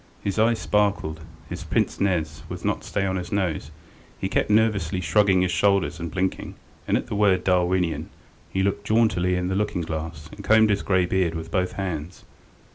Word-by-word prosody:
His 100 +1 -1
eyes 115 +1 +3
sparkled, 100 -8 0 0.3
his - - -6
pince - - 0
nez 80 -6 0
would - - -6
not - - -1
stay 100 - -1
on 95 -1 -1
his 90 -1 -6
nose, 90 -8 -1 0.5
he - - -1
kept - - 0
nervously 105 -5 +2
shrugging 95 +2 +3
his 90 - 0
shoulders 90 -4 +2
and 85 0 -4
blinking, 95 +3 -2 0.3
and - - +3
at - - -3
the - - -6
word 100 -3 +3
"Darwinian" 90 -2 +1 0.4
he 95 - 0
looked 100 +1 -1
jauntily 105 -5 +2
in 90 0 -1
the 95 - -1
looking 100 -3 -1
glass 80 -1 -5
and - - -10
combed 110 -1 +5
his 100 - +1
grey 95 -2 +2
beard 90 -2 0
with 80 0 -6
both 90 -1 0
hands. 90 -3 -5
95 Hz, 190 wpm, -24 LUFS, 85-100 Hz, 0.5 s, combed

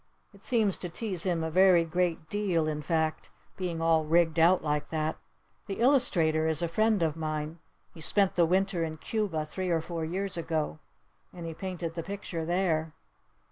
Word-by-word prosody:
It 200 -1 -18
seems 220 -6 +2
to 180 - -4
tease 190 -1 -1
him 170 -3 0
a 160 - -2
very 180 -1 +5
great 170 -1 -1
deal 185 -6 0
in 150 -1 -2
fact. 160 0 -1 0.3
Being 175 -3 -3
all 165 -1 +3
rigged 165 +1 +2
out 175 +3 +5
like 150 -1 -1
that. 155 0 -2 0.5
The 195 - -5
illustrator 170 - +3
is 160 +1 +2
a - - +1
friend 215 +2 +2
of 155 -2 0
mine. 155 0 -4 0.3
He 165 - -12
spent 195 +3 +3
the 170 -2 +3
Winter 190 0 +1
in 155 -1 -4
Cuba 185 -5 -2
three 185 +4 -4
or 165 -1 +2
four 165 0 -5
years 185 +3 -2
ago. 160 -2 -2 0.5
And 175 -2 -8
he 165 - -5
painted 175 -2 -5
the 165 - -4
picture 185 -3 -5
there." 165 -3 0
170 Hz, 180 wpm, -29 LUFS, 160-185 Hz, 0.5 s, very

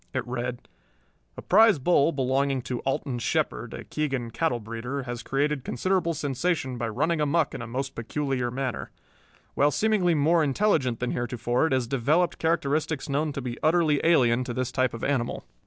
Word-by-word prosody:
It 130 - -1
read: 125 0 -4 0.7
A - - -7
prize 215 0 +5
bull 150 +2 +3
belonging 135 -1 0
to 125 -1 -3
Alton 135 -2 -2
Shepard, - - -1
a - - -7
Keegan 135 -6 -3
cattle 125 -2 0
breeder, 115 +5 -5
has 120 -1 -5
created 145 0 -1
considerable 170 +6 0
sensation 140 -2 -1
by 115 - -1
running 150 +8 0
amuck 155 +3 +1
in 135 - -5
a 115 - -6
most 135 +3 -3
peculiar 130 +1 -2
manner. 130 0 -3 0.6
While 145 - +3
seemingly 190 -1 +2
more 160 +3 +3
intelligent 140 - +1
than 125 - -1
heretofore, 120 +3 0
it 140 - -1
has 130 -2 +1
developed 140 +8 +1
characteristics 155 -2 0
known 150 +2 0
to 140 -2 -5
be 120 -1 -5
utterly 155 -2 +3
alien 130 -7 +4
to 120 -2 -5
this 130 -1 -2
type 130 -2 0
of 115 - -8
animal. 130 -4 -1
135 Hz, 170 wpm, -26 LUFS, 125-155 Hz, 0.7 s, prize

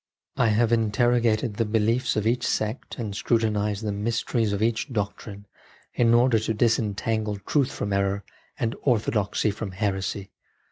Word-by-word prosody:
I - - +3
have 110 +1 +2
interrogated 115 0 +2
the 115 - +2
beliefs 115 +3 +1
of 105 -1 0
each 120 +2 +1
sect 110 +3 -2
and 110 -5 -4
scrutinised 105 -2 0
the 105 - -1
mysteries 115 +1 -1
of 100 +1 -1
each 115 +5 0
doctrine, 100 -1 -4 0.5
in 115 -1 +4
order 120 -1 +4
to 110 +1 -2
disentangle 110 -1 0
truth 140 -4 +1
from 100 -1 -3
error 100 0 0 0.3
and 115 0 -1
orthodoxy 110 -4 +1
from 100 -1 -6
heresy. 95 -1 -2
110 Hz, 145 wpm, -25 LUFS, 105-115 Hz, 0.5 s, in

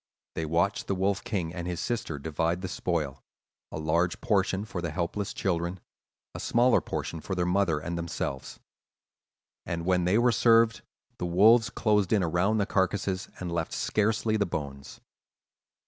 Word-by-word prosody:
They 80 - -3
watched 85 +6 0
the 100 - 0
Wolf 95 +1 0
King 90 -6 -2
and 90 -1 -5
his 90 -2 -3
sister 110 -9 -2
divide 80 +4 -1
the 95 - -3
spoil; 80 -7 -2 0.5
a - - -5
large 85 +3 0
portion 100 -4 +1
for 90 -4 -5
the 85 - -2
helpless 90 +5 -2
children, 90 -1 -2 0.5
a - - -6
smaller 120 +1 +3
portion 80 - -4
for 95 - -4
their 90 -1 0
mother 90 -3 +2
and 85 +3 -4
themselves. 70 -5 -4 1.0
And 85 0 -4
when 90 -1 +2
they 95 +4 +3
were 120 +1 +4
served, 115 0 +4 0.4
the 90 - -2
wolves 110 +7 +5
closed 105 -4 +1
in 105 -4 +3
around 90 +6 +1
the 100 - +2
carcasses 95 0 -1
and 90 -2 -4
left 85 -1 -2
scarcely 110 +1 +1
the 100 -2 +1
bones. 70 -4 -6
90 Hz, 165 wpm, -28 LUFS, 85-105 Hz, 1.0 s, wolves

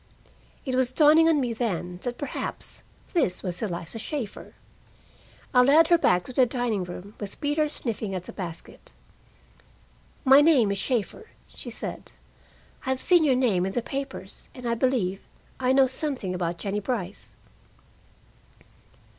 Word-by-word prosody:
It 260 - -2
was 255 -1 +3
dawning 310 +3 +6
on 315 -3 +3
me 245 -3 -1
then 180 -6 -3
that 245 -1 -4
perhaps 285 -3 -3 0.3
this 195 - +1
was 180 -2 0
Eliza 175 0 -4
Shaeffer. 235 -3 -6 1.0
I 250 - +7
led 305 +6 +5
her 345 - +6
back 180 - +2
to 255 - -9
the 255 0 +4
dining 235 -6 -1
room, 180 +3 -9
with 200 -2 -6
Peter 300 +1 0
sniffing 220 -8 -3
at 180 - -4
the - - -9
basket. 170 -4 -8 1.3
"My 270 +2 +8
name 280 -10 +4
is 200 - -2
Shaeffer," 255 - -2 0.2
she - - -8
said. - - -6 0.7
"I've 260 0 -1
seen 350 +1 +5
your 275 -4 +3
name 225 -9 +2
in 190 +1 -2
the 240 - -1
papers, 275 +2 -6
and 250 -2 -9
I 235 - +1
believe 230 -6 0 0.4
I 255 0 +2
know 265 0 +5
something 260 -7 -2
about 175 -1 -2
Jennie 200 +3 -2
Brice." 205 -3 -5
245 Hz, 150 wpm, -26 LUFS, 195-270 Hz, 1.3 s, My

